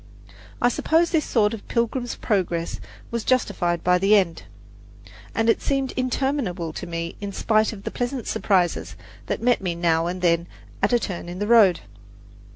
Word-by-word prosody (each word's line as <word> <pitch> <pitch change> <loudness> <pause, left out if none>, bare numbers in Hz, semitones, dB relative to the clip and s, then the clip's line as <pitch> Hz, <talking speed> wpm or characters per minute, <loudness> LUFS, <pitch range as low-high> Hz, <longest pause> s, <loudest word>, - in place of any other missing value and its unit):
I 245 - +4
suppose 325 +7 +2
this 315 -3 +1
sort 215 -2 +2
of 220 - -8
Pilgrim's 240 +1 -1
Progress 175 -5 -1 0.3
was 235 -2 -2
justified 180 -9 0
by 180 0 +3
the 195 +3 +4
end; 180 -5 +1 0.9
but 225 0 +1
it 225 - +3
seemed 275 -1 0
interminable 255 - -2
to 180 - -6
me, 170 0 -4
in 200 -1 -4
spite 215 +2 +2
of 200 -3 -10
the - - -4
pleasant 245 -1 -3
surprises 180 -4 0 0.3
that - - -3
met 245 -3 +3
me 180 -3 -2
now 165 -1 +1
and 180 +1 -4
then 170 0 +2 0.3
at - - +2
a 240 - +5
turn 180 -6 -5
in 175 - -6
the 205 - -2
road. 210 -6 +5
205 Hz, 170 wpm, -23 LUFS, 175-240 Hz, 0.9 s, a